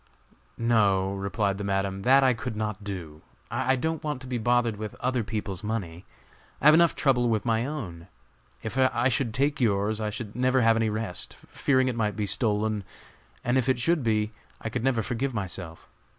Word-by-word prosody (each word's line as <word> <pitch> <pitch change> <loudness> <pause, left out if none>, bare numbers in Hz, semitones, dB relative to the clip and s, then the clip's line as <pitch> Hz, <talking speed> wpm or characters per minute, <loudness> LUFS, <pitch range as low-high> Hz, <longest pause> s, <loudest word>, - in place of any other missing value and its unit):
"No," 100 -5 +2
replied 100 0 -1
the - - -3
Madam, 95 -1 -1
"that 135 +5 +5
I 130 -1 +5
could 125 -1 -5
not 105 -1 -3
do. 85 -6 -6 0.3
I 130 +3 +1
don't 160 +4 -2
want 150 -4 -2
to 130 - -9
be 125 -2 -2
bothered 120 -1 +2
with 110 0 -6
other 125 -1 -1
people's 105 -2 -3
money. 95 -6 -4 0.5
I - - -6
have 150 - +9
enough 170 +1 +5
trouble 125 -4 +2
with 110 -1 0
my 115 +1 +1
own. 95 - -6 0.6
If 110 +4 -3
I 130 -1 +3
should 125 -2 0
take 140 +4 0
yours, 105 -1 +1
I 105 - -1
should 105 0 -6
never 130 +1 +2
have 115 -1 +5
any 115 -1 +1
rest, 105 -4 -3
fearing 130 -2 0
it 125 - -1
might 105 -3 0
be 105 - -1
stolen; 105 0 0 0.6
and 120 +2 +2
if 130 +1 0
it 130 - +3
should 165 +6 +1
be, 110 -1 +1 0.3
I 115 - -4
could 120 0 -3
never 125 -4 +1
forgive 125 +5 -2
myself. 90 -4 -5
115 Hz, 195 wpm, -27 LUFS, 105-130 Hz, 0.6 s, have